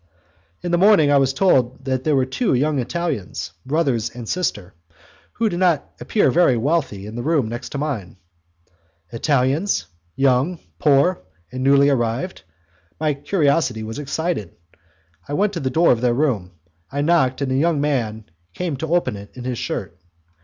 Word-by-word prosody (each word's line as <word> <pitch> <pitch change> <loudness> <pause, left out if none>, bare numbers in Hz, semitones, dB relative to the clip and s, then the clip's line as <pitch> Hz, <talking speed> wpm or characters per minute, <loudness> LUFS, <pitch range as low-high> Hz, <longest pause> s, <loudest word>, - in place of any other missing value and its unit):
In 175 - -2
the 175 - +2
morning 190 -7 +5
I 145 - +5
was 135 -1 +2
told 130 -6 +2
that 130 -1 -1
there 155 0 +2
were 130 -1 +2
two 135 - 0
young 145 +2 +1
Italians, 130 - -3 0.2
brother 150 -1 +1 0.2
and 120 -2 -7
sister, 100 - -2 0.6
who 230 - 0
did 175 -4 -2
not 175 -6 +1
appear 215 - +2
very 165 -8 +4
wealthy, 130 -6 -1
in 105 - -8
the 120 - -4 0.2
next 120 +3 -5
room - - -10
to - - -5
mine. 135 -12 -4 0.9
Italians, 135 - +1 0.3
young, 135 +6 +2 0.2
poor 150 +5 +3 0.3
and 130 0 -5
newly 140 +1 +5
arrived, 125 +8 -1 0.6
my 155 -1 +1
curiosity 140 - 0
was 110 +5 -6
excited. 150 - -3 0.7
I 145 - -5
went 205 +6 +1
to 175 - -3
the 130 - -1
door 165 +6 +4
of 120 - +1
their 120 -1 +2
room, 115 -11 0 0.4
I 140 - -1
knocked, 145 -5 +2
and 135 -2 -1
a - - +1
young 155 +2 +2
man 115 -7 -1 0.3
came 170 -6 -3
to 160 +4 -1
open 175 -11 0
it 100 0 -10
in 125 - -8
his 125 -2 -3
shirt. 85 - -4
140 Hz, 170 wpm, -21 LUFS, 125-165 Hz, 0.9 s, morning